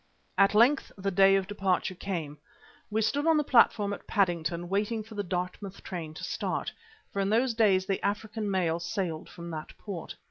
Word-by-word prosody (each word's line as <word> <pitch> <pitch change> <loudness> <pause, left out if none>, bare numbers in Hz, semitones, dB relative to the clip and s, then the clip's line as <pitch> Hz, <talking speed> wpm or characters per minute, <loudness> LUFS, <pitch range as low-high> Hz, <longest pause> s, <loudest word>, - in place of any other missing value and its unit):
At 195 +1 +4
length 250 +6 +4
the 195 0 -1
day 195 +1 +6
of 195 -1 +1
departure 190 -2 0
came. 165 -6 -5 0.5
We 220 +1 +1
stood 285 +7 +1
on 325 -1 +5
the 300 - +2
platform 220 -6 +4
at - - -9
Paddington 175 -3 0
waiting 210 +4 -1
for 220 - -13
the 205 - -2
Dartmouth 185 +1 -4
train 160 -4 -6
to - - -8
start, - - -2 0.4
for 200 - -2
in 195 0 +1
those 235 +3 +2
days 200 -5 +3
the 195 0 -2
African 210 +1 -2
mail 175 -4 +1
sailed 175 -2 -3
from 170 -1 -8
that 155 -1 -7
port. 190 -6 -7
195 Hz, 185 wpm, -29 LUFS, 175-215 Hz, 0.5 s, day